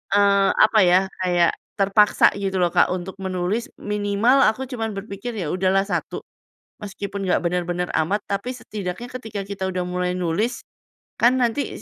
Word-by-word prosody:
eee, 200 -1 +4
apa 215 0 +5
ya, 180 0 +5 0.2
kayak 175 -2 +3 0.3
terpaksa 200 +1 +4
gitu 190 -1 -2
loh 175 -2 +2
Kak - - +4
untuk 185 +1 -4
menulis 190 +4 -2
minimal 210 +5 +1
aku 260 +5 -4
cuman 225 -5 -4
berpikir 200 +3 -6
ya 165 -6 -3
udahlah 190 +1 +2
1, 200 - -3 0.6
meskipun 200 0 -6
nggak 185 -2 +2
benar-benar 180 0 -1 0.2
amat 195 +7 0
tapi 200 +5 -3
setidaknya 215 -3 -6
ketika 220 -5 -6
kita 190 -1 -3
udah 180 -1 -3
mulai 180 0 -2
nulis, 195 +8 -1 0.6
kan 245 +2 +5
nanti 240 0 -1
200 Hz, 150 wpm, -22 LUFS, 180-215 Hz, 0.6 s, apa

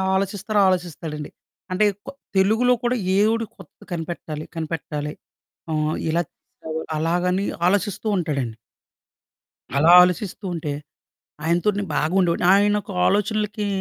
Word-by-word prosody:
ఆలోచిస్తారో 200 +2 0
ఆలోచిస్తాడండి. 165 -4 -2 0.4
అంటే 190 +3 +3 0.2
కొ - - -4 0.2
తెలుగులో 220 +6 +4
కూడా 245 +1 +1 0.2
ఏవుడు 225 +2 +2
కొత్తది 190 -5 -16
కనిపెట్టాలి 165 -2 -5
కనిపెట్టాలి 150 -2 -4 0.6
అహ్, 155 0 0
ఇలా 170 +2 +2
చేశారు 160 0 -8 0.2
అలాగని 180 +4 +1 0.2
ఆలోచిస్తూ 205 +2 0
ఉంటాడండి. 135 -9 -2 1.2
అలా 160 +4 +6
ఆలోచిస్తూ 180 +2 0
ఉంటే, 150 -3 -3 0.7
ఆయనతో 170 +4 +1
నేను 200 -2 -3
బాగుండేవాడిని. 175 +1 +2
ఆయన 205 +1 +4
యొక్క 205 -1 -9
ఆలోచనలకి, 210 +1 0
180 Hz, 110 wpm, -23 LUFS, 160-205 Hz, 1.2 s, అలా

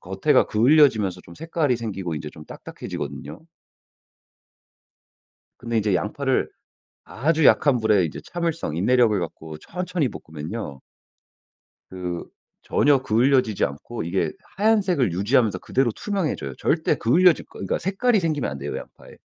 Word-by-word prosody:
겉에가 - - +2
그을려지면서 110 - +3
좀 85 - -13
색깔이 160 -5 -1
생기고 95 -7 -4
이제 75 0 -5
좀 75 - -13
딱딱해지거든요. 75 -1 -7 2.2
근데 115 -1 -3
이제 105 -2 +1
양파를 130 +9 0 0.5
아주 155 +4 0
약한 140 -4 +5
불에 105 -5 +3
이제 80 - -6
참을성 165 - -3
인내력을 110 +3 +3
갖고 80 -2 -7
천천히 180 - -3
볶으면요. 80 - -7 1.1
그 90 -2 -5 0.4
전혀 145 -1 +3
그을려지지 125 -2 +2
않고 80 - -5
이게 90 +3 -1 0.2
하얀색을 190 - +2
유지하면서 105 +4 +2
그대로 130 -2 0
투명해져요. 170 - -3
절대 160 0 +1
그을려질 170 +10 +4
거 - - -25
그러니까 - - -2
색깔이 200 +4 +1
생기면 155 - -1
안 70 - -6
돼요 70 +2 -5
양파에. - - -11
120 Hz, 340 characters per minute, -23 LUFS, -, 2.2 s, 약한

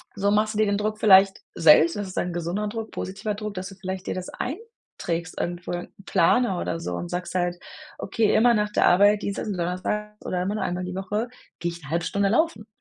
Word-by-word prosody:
so 200 0 +1
machst 215 +1 +2
du - - -1
dir 215 - +4
den 200 0 +1
Druck 215 +1 -2
vielleicht 195 -2 +6
selbst 165 +1 +6
und 205 - -2
das 195 - -5
ist 185 - -10
ein 175 0 -2
gesunder 175 +5 -2
Druck, 225 +1 -5
positiver 200 +3 -4
Druck, 210 0 -5
dass 185 +1 -5
du 195 - -12
vielleicht 190 0 -6
dir - - -1
das 185 -1 -5
einträgst 250 - -5
irgendwo 175 0 -3
'n 175 0 -5
Planer 190 +2 +3
oder 165 - -2
so 90 - -3
und 85 0 -5
sagst 180 0 -4
halt: 175 -1 0 0.4
„Okay, 215 +2 +1
immer 240 +2 +5
nach 210 -1 0
der - - +3
Arbeit, 205 +3 +5
Dienstags 200 +2 -3
und 195 - -3
Donnerstags 210 +5 -3
oder 180 - -1
immer 200 +3 -2
nur 215 - -2
einmal 180 +1 -2
die 180 - -5
Woche, 210 +5 -2 0.3
gehe 170 0 -1
ich 170 0 -10
'ne 145 - -10
halbe 170 0 0
Stunde 200 +2 +1
laufen“. 235 -3 +1
195 Hz, 235 wpm, -25 LUFS, 175-210 Hz, 0.4 s, vielleicht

